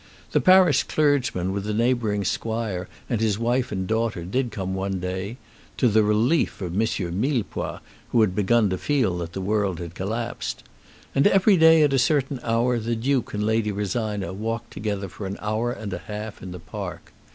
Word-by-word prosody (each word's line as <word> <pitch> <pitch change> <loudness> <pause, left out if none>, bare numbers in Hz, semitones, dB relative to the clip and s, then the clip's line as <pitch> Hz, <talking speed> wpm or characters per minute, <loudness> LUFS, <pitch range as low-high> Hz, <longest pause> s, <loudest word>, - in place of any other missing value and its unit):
The - - +2
parish 185 -6 +6
clergyman 135 -12 +1
with 100 0 -2
the 105 0 -2
neighbouring 115 -3 +1
squire 110 -5 -2 0.2
and 115 -4 -1
his 105 -3 +1
wife 120 +2 0
and 95 -1 -2
daughter 110 -4 -1
did 125 +7 -1
come 95 -4 -4
one 95 0 -2
day, 95 +5 -4 0.4
to 125 - +3
the 110 -1 +4
relief 110 +9 +2
of 90 -3 -4
M. 95 - 0 0.4
Millepois, 125 -3 -2 0.3
who 115 - +3
had 105 -4 +3
begun 105 +1 +2
to 95 - -2
feel 120 -12 +1
that 85 -1 -5
the 95 - -4
world 100 -2 0
had 85 0 -7
collapsed. 115 +6 -4 0.5
And 140 - +4
every 195 +1 +5
day 160 -2 +7
at 145 -2 +3
a 135 - +3
certain 135 -1 +1
hour 120 +1 +1
the 115 +1 -1
Duke 125 0 0
and 105 - -1
Lady 110 -1 +1
Rosina 105 -2 -2
walked 115 +3 -4
together 100 -2 -3
for 95 +2 -7
an 100 - -5
hour 110 +3 -1
and 110 -5 -5
a - - -3
half 105 0 -7
in 95 - -7
the 90 - -7
park. 80 - -7
110 Hz, 190 wpm, -24 LUFS, 95-120 Hz, 0.5 s, day